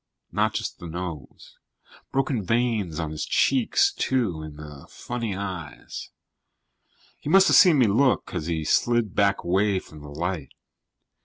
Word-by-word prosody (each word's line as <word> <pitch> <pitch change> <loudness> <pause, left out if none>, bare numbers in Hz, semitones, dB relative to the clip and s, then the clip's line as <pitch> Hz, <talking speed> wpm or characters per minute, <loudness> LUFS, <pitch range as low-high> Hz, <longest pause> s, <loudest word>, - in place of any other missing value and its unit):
Not - - 0
just - - -4
the 85 - -8
nose. 85 -5 -8 0.5
Broken 130 -5 0
veins 110 -6 0
on 80 -2 -3
his 75 - -4
cheeks, 275 - +2
too, 115 - -1
and 75 -1 -9
the 75 -2 -11
funny 115 -5 -4
eyes. 95 -6 -7 1.1
He - - -6
must 195 +3 +6
have - - +5
seen 175 -5 +7
me 130 - +5
look, 120 +6 +2
because 80 - -5
he 80 -2 -2
slid 120 +4 +1
back 100 -1 +2
away 95 +3 +2
from 80 -4 -9
the 75 - -10
light. 80 -1 -4
95 Hz, 150 wpm, -25 LUFS, 80-120 Hz, 1.1 s, seen